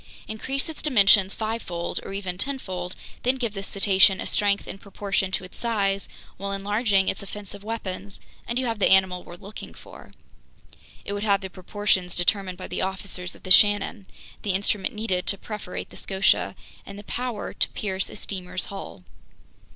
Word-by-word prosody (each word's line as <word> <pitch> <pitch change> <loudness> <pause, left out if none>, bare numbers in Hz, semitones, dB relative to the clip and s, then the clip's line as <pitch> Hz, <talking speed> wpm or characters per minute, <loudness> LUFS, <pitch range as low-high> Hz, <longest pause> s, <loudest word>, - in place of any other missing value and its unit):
Increase 265 +5 -2
its 320 - -6
dimensions 200 -8 +6
fivefold 215 -7 -2
or - - -7
even 195 -2 -3
tenfold, 185 -10 -3 0.3
then 255 +2 +2
give 235 -5 -2
this 195 -1 -4
cetacean 195 -1 +5
a - - -3
strength 200 -1 +2
in 195 - -6
proportion 195 -1 -1
to - - +1
its 185 - -7
size 200 -4 0 0.3
while 200 +1 -3
enlarging 200 0 +2
its - - 0
offensive 200 0 -7
weapons, 200 -3 -4 0.3
and 235 - -1
you 260 - +1
have 225 -3 -1
the - - +4
animal 190 -2 +5
we're 175 - -10
looking 200 +4 -9
for. - - -13 0.9
It 200 - -3
would 205 - -2
have 200 -2 +3
the 190 -1 -6
proportions 185 -1 0
determined 185 +1 +2
by 185 - -6
the - - -3
officers 190 -1 -3
of - - -17
the 185 - -6
Shannon, 205 -1 +5 0.3
the 200 - 0
instrument 200 +1 0
needed 190 -5 -1
to 200 - +2
perforate 210 -3 -6
the - - -10
Scotia, 185 - +2 0.3
and 200 - -9
the 205 - -8
power 245 0 -3
to - - +1
pierce 190 -2 -2
a - - -9
steamer's 185 -3 -3
hull. 195 - -7
200 Hz, 175 wpm, -26 LUFS, 190-210 Hz, 0.9 s, dimensions